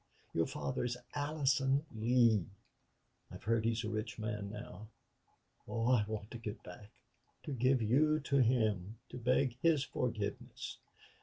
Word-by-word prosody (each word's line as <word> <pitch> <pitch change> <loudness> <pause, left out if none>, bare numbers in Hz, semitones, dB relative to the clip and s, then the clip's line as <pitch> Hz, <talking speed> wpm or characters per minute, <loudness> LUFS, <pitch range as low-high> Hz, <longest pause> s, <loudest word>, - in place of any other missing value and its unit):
Your 80 - +2
father 70 - -2
is 125 0 -1 0.2
Allison 145 -1 +1
Lee. 115 -2 +4 0.9
I've - - -10
heard 115 0 +1
he's 115 0 +1
a - - -2
rich 110 +3 -3
man 105 -2 -3
now.... 105 -1 -8 0.8
Oh, 115 +2 +1
I 115 -5 +4
want 105 -1 -5
to 120 - -6
get 105 -2 -6
back 100 +4 -11 0.5
to - - -5
give 130 -1 +2
you 150 +8 +4
to 140 0 +1
him 110 -5 +2
to 125 - -7
beg 125 +1 +2
his 160 -4 +4
forgiveness.... 110 -6 -3
115 Hz, 145 wpm, -35 LUFS, 105-130 Hz, 0.9 s, Lee